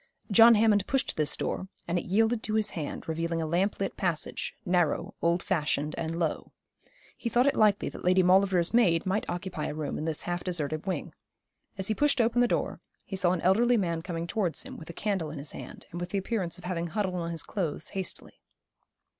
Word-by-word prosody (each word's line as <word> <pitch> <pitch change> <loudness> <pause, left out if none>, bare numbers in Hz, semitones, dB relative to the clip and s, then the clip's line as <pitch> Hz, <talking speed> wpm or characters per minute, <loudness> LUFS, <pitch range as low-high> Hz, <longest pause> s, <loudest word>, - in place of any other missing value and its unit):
John 225 +3 +8
Hammond 210 -2 +3
pushed 270 0 0
this 150 -1 +1
door, 190 - -3 0.2
and 175 +1 +1
it - - -7
yielded 220 +4 +2
to 215 0 -2
his 220 -1 +1
hand, 155 -4 -5
revealing 165 +1 -1
a 160 - -1
lamp 180 +6 0
lit 195 - -2
passage, 175 -5 -1
narrow, 175 -4 +1
old 170 +1 +2
fashioned, 150 -3 0
and 165 0 -3
low. 165 -3 -2 0.6
He 235 - -3
thought 240 +3 +3
it 280 - +3
likely 210 -2 +3
that - - -10
Lady 185 +1 +4
Maulevrier's 185 -1 +4
maid 180 -9 +4
might 190 +3 -1
occupy 175 -3 -3
a - - -4
room 150 -2 -3
in 155 - -3
this 160 -2 -1
half 175 0 -3
deserted 155 -2 -2
wing. 190 - -3 0.6
As 190 -1 -2
he 220 - +1
pushed 285 +3 +2
open 235 +1 +3
the 245 - +4
door - - -1 0.2
he 195 - -5
saw 185 -2 +3
an 180 -2 -1
elderly 235 +6 +4
man 170 -5 -1
coming 170 -1 -4
towards 175 -1 -1
him, - - -9
with 160 - -10
a - - -6
candle 190 -5 -2
in 155 - -7
his 140 +1 -5
hand, - - -9
and 175 - -5
with 175 - -4
the 200 - -1
appearance 190 -4 -2
of - - -14
having 175 -2 -2
huddled 195 +1 -1
on 170 -2 -3
his 165 -2 -3
clothes 165 -5 -3
hastily. 190 -3 -6
180 Hz, 215 wpm, -28 LUFS, 165-205 Hz, 0.6 s, John